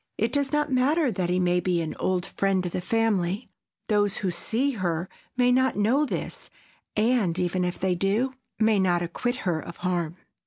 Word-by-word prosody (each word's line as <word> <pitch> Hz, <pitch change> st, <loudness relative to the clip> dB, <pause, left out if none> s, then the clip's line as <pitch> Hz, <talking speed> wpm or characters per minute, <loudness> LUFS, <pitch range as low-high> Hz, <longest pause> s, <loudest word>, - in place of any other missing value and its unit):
It 225 Hz, +3 st, 0 dB
does 280 Hz, -2 st, +1 dB
not 295 Hz, -1 st, +1 dB
matter 270 Hz, +3 st, +3 dB
that 180 Hz, -3 st, -1 dB
he 180 Hz, -, +2 dB
may 180 Hz, 0 st, +2 dB
be 180 Hz, 0 st, 0 dB
an 160 Hz, -2 st, -3 dB
"old 185 Hz, -1 st, 0 dB
friend 195 Hz, -1 st, 0 dB
of 175 Hz, -, -2 dB
the 180 Hz, -, -2 dB
family,"—those 205 Hz, 0 st, -1 dB
who 190 Hz, -3 st, -1 dB
see 245 Hz, +10 st, 0 dB
her 175 Hz, -6 st, -2 dB, 0.3 s
may 250 Hz, 0 st, +4 dB
not 260 Hz, +1 st, +3 dB
know 250 Hz, +9 st, +3 dB
this -, -, -5 dB, 0.5 s
and, 215 Hz, -6 st, +2 dB
even 180 Hz, 0 st, 0 dB
if 180 Hz, 0 st, -2 dB
they 190 Hz, -1 st, +1 dB
do, 205 Hz, +9 st, 0 dB, 0.2 s
may 220 Hz, -2 st, +3 dB
not 175 Hz, -2 st, +2 dB
acquit 245 Hz, +8 st, -2 dB
her 170 Hz, -3 st, +1 dB
of 170 Hz, +1 st, -9 dB
harm. 175 Hz, -2 st, -1 dB
195 Hz, 185 wpm, -26 LUFS, 180-245 Hz, 0.5 s, may